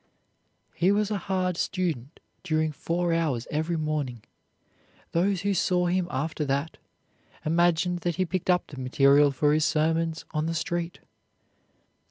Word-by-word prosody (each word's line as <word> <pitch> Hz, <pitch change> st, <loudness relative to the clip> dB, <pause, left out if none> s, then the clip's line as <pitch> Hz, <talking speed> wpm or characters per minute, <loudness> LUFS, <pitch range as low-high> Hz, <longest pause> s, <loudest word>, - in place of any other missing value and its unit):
'" -, -, -46 dB, 0.3 s
He 180 Hz, +3 st, +2 dB
was 210 Hz, +1 st, +1 dB
a 205 Hz, -, 0 dB
hard 185 Hz, -2 st, 0 dB
student 165 Hz, -9 st, -2 dB, 0.2 s
during 155 Hz, -3 st, 0 dB
four 170 Hz, +3 st, -1 dB
hours 150 Hz, -8 st, 0 dB
every 160 Hz, +3 st, -1 dB
morning; 150 Hz, -7 st, -2 dB, 0.9 s
those 185 Hz, +2 st, +1 dB
who 200 Hz, 0 st, +1 dB
saw 180 Hz, -1 st, +1 dB
him 180 Hz, 0 st, +1 dB
after 150 Hz, +3 st, -2 dB
that 140 Hz, +3 st, -2 dB, 0.7 s
imagined 175 Hz, +2 st, +2 dB
that 175 Hz, -1 st, -2 dB
he 185 Hz, -, +1 dB
picked 185 Hz, +1 st, -3 dB
up 180 Hz, -1 st, +3 dB
the 140 Hz, -, -10 dB
material 140 Hz, +3 st, +5 dB
for 145 Hz, +2 st, +2 dB
his 155 Hz, 0 st, +2 dB
sermons 160 Hz, +1 st, 0 dB
on 155 Hz, 0 st, -1 dB
the 165 Hz, -, -2 dB
street. 170 Hz, +1 st, -3 dB
165 Hz, 150 wpm, -27 LUFS, 150-180 Hz, 0.9 s, material